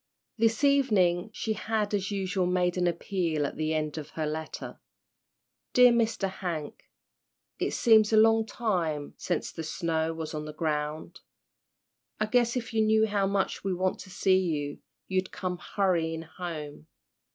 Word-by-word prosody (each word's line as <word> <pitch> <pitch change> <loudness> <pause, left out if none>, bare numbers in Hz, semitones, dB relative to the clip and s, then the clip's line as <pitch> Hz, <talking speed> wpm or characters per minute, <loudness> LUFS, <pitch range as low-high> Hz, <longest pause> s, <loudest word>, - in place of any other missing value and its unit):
This 225 +3 +1
evening 210 -10 +3
she 220 0 -2
had 215 -1 -2
as 195 -2 0
usual 190 -2 -1
made 180 -1 +1
an 180 -1 +1
appeal 170 -3 -1
at - - -4
the 155 0 -1
end 155 0 -2
of 150 0 -8
her 155 - 0
letter. 155 +1 -5 0.9
"Dear 250 0 +7
Mr. 225 -4 +1
Hank, 175 -6 -5 0.7
it - - 0
seems 220 -2 +4
a 220 - +4
long 225 0 +5
time 170 -11 -2
sence - - -2
the 165 - -6
snow 160 0 -1
was 160 -1 -5
on 150 0 -4
the 150 - -7
ground. 155 -1 -3 1.0
I 215 - +2
guess 240 +2 +2
if 230 -2 -5
you 220 - +2
knew 220 0 +4
how 200 -2 +1
much 195 0 -1
we 190 -2 -1
want 185 +1 -1
to 190 - -10
see 190 0 +3
you 150 -5 -2 0.3
you'd 185 0 -1
come 180 -1 -4
hurryin' 165 -5 0
home. 160 -3 -7
185 Hz, 160 wpm, -28 LUFS, 160-215 Hz, 1.0 s, Dear